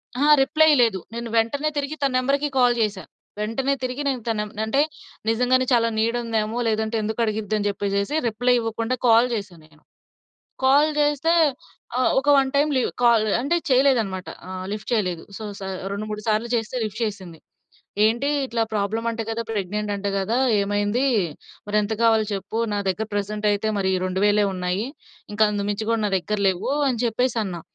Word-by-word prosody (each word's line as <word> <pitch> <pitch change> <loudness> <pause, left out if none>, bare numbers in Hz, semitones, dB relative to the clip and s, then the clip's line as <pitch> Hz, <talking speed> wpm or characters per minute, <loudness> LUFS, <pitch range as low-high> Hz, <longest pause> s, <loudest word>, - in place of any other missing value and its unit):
అహా! 285 +4 +2
రిప్లై 315 +3 +4
లేదు. 220 -5 +2
నేను 235 0 -5
వెంటనే 280 +7 +1
తిరిగి 285 +2 -2
తన 275 -1 +2
నంబర్‌కి 280 +3 +1
కాల్ 245 -1 +4
చేశా. 205 -3 -1 0.4
వెంటనే 260 +6 0
తిరిగి 255 +3 -3
నేను 260 -4 -1
తనం 210 -2 -1
నంటే 220 +6 +1 0.5
నిజంగానే 250 +3 +2
చాలా 230 -1 +4
నీడ్ 230 +2 +1
ఉందేమో! 225 0 -1
లేదంటే 220 +1 0
ఎందుకడిగిద్దని 215 -1 -1
చెప్పేసేసి 200 +5 -1
రిప్లై 245 +3 +1
ఇవ్వకుండా 230 +2 -2
కాల్ 230 +2 +6
చేశా 200 -5 -4
నేను. 155 0 -24 0.8
కాల్ 285 +4 +5
చేస్తే 295 +2 +1 0.7
ఆహ్, 255 - +3
ఒక 275 - -8
వన్ 270 -1 +3
టైం 290 +2 +3
లివ్ 255 - +1
కాల్ 235 -2 +5 0.2
అంటే 285 +6 +1
చేయలేదన్నమాట. 245 -8 +2 0.2
ఆహ్, 185 0 -5
లిఫ్ట్ 210 0 -5
చేయలేదు. 180 -7 0
సో, 220 - -8 0.2
స - - -15 0.3
రెండు 205 +2 -4
మూడు 210 0 -4
సార్లు 215 +2 +1
చేస్తే 225 +2 -3
లిఫ్ట్ 215 +1 -5
చేసింది. 185 -6 -7 0.7
ఏంటి 235 +6 +1 0.2
ఇట్లా 230 -2 -1
ప్రాబ్లమ్ 215 +3 -1
అంట 230 0 -3
కదా! 225 +1 -2
ప్రెగ్నెంట్ 210 0 -2
అంట 200 0 -4
కదా! 210 +5 0 0.2
ఏమైంది? 205 +4 0 0.6
మరెంత 210 +1 0
కావాలో 225 -1 +4
చెప్పు? 200 +3 -4 0.2
నా - - 0
దగ్గర 205 +4 -2
ప్రెజెంట్ 210 +1 -2
అయితే 205 +1 -1
మరి 190 -1 +1
2000 205 +3 +2
ఉన్నాయి. 180 +3 -2 0.5
ఇంకా 210 +1 +3
అంతకుమించి 205 +1 -2
కూడా 230 -1 +1
నా 205 - -1
దగ్గర 210 +3 -3
లెవ్వు 190 +9 -2
అని 245 -3 -1
చెప్పేసన్నా. 225 -6 -1
220 Hz, 160 wpm, -23 LUFS, 205-245 Hz, 0.8 s, కాల్